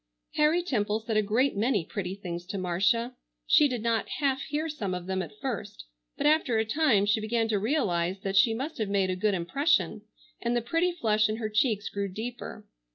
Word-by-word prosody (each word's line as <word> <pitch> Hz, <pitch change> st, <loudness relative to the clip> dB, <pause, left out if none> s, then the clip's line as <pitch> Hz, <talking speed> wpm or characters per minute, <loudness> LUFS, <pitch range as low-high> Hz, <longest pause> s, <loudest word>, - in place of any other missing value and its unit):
Harry 310 Hz, +4 st, +3 dB
Temple 215 Hz, -, 0 dB
said 225 Hz, 0 st, -4 dB
a 215 Hz, -, +4 dB
great 225 Hz, +6 st, +1 dB
many 210 Hz, -4 st, +1 dB
pretty 190 Hz, -2 st, -4 dB
things 175 Hz, -3 st, -6 dB
to 200 Hz, -, -4 dB
Marcia. 195 Hz, +7 st, +1 dB, 0.3 s
She 300 Hz, -, +5 dB
did 245 Hz, -5 st, -4 dB
not 230 Hz, -2 st, 0 dB
half 270 Hz, -2 st, 0 dB
hear 305 Hz, +3 st, -2 dB
some 215 Hz, -, -3 dB
of 180 Hz, -1 st, -6 dB
them 190 Hz, 0 st, -1 dB
at 210 Hz, -, -8 dB
first, 230 Hz, -, -5 dB, 0.3 s
but -, -, -2 dB
after 295 Hz, -6 st, +3 dB
a 220 Hz, -, +1 dB
time 225 Hz, -5 st, +3 dB
she 205 Hz, +2 st, +2 dB
began 225 Hz, +1 st, 0 dB
to 210 Hz, -2 st, +1 dB
realize 195 Hz, -, 0 dB
that 195 Hz, 0 st, -3 dB
she 225 Hz, +3 st, +5 dB
must 270 Hz, +4 st, -5 dB
have 215 Hz, -2 st, -1 dB
made 195 Hz, -2 st, +1 dB
a -, -, -1 dB
good 200 Hz, +2 st, +1 dB
impression, 200 Hz, -, +1 dB, 0.4 s
and 235 Hz, 0 st, 0 dB
the 240 Hz, -, +1 dB
pretty 330 Hz, +8 st, +1 dB
flush 215 Hz, -10 st, +1 dB
in 215 Hz, -, -1 dB
her 220 Hz, -1 st, -3 dB
cheeks 215 Hz, -1 st, +1 dB
grew 200 Hz, 0 st, -3 dB
deeper. 220 Hz, +1 st, -7 dB
220 Hz, 210 wpm, -28 LUFS, 195-260 Hz, 0.4 s, She